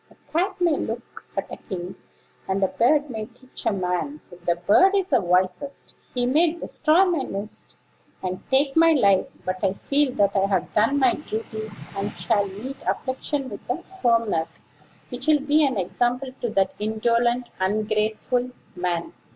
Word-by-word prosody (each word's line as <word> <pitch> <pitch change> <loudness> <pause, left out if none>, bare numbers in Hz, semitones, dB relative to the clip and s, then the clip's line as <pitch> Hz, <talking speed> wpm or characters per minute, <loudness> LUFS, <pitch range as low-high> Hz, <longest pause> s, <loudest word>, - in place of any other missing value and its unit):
"A - - -21 0.2
cat 375 +4 0
may 340 -4 +3
look 230 +2 -6
at - - 0
a - - -6
king; 180 -3 -6 0.5
and 195 +1 0
a - - +5
bird 290 +4 +2
may 220 -2 -4
teach 250 +2 -8
a - - +4
man, 185 - -2
if 175 0 -14
the 170 - +3
bird 215 - +4
is 385 -1 0
the - - +4
wisest. 180 +8 0 0.2
He 245 -1 +1
may 310 +6 +3
destroy 335 +1 +2
my 345 -6 +1
nest, 205 -3 -6 0.5
and 185 0 -3
take 270 +1 +3
my 330 0 +6
life; 200 -9 +4 0.2
but 185 +1 -3
I 190 -1 +3
feel 280 +6 +1
that 205 -6 +2
I 195 0 +3
have 190 -3 -1
done 225 +7 +3
my 260 -3 +4
duty, 220 -5 -5 0.3
and 200 +1 -2
shall 200 +4 +1
meet 230 +8 -7
affliction 270 +1 -2
with - - -7
a - - -2
firmness 230 - 0 0.5
which 255 +3 -5
will 305 -1 +5
be 295 +2 +3
an 265 -6 +1
example 245 +7 0
to 240 - 0
that 195 -3 +1
indolent, 235 +3 +1
ungrateful 215 +5 0 0.3
man." 175 -1 -2
230 Hz, 170 wpm, -24 LUFS, 195-280 Hz, 0.5 s, my